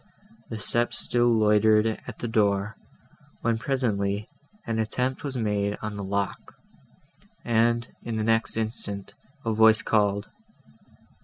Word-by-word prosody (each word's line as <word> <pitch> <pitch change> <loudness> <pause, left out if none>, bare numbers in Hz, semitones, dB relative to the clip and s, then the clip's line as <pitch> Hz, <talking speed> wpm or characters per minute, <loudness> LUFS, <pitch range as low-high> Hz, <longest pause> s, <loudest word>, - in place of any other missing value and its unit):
The 115 - -4
steps 120 +3 +1
still 120 0 +2
loitered 110 -1 +4
at 110 -1 -4
the 120 - -4
door, 105 -2 +1 0.7
when 115 -1 0
presently 105 -6 -1 0.4
an 115 -1 -2
attempt 125 +4 -1
was 135 -3 -3
made 105 -2 0
on 105 -1 -4
the 100 - -5
lock, 100 0 -3 0.9
and, 115 0 +2
in 115 - -4
the 110 - -1
next 115 0 +1
instant, 110 -3 -3 0.3
a 115 - +1
voice 110 0 +5
called. 100 -2 +1
110 Hz, 130 wpm, -26 LUFS, 105-115 Hz, 0.9 s, voice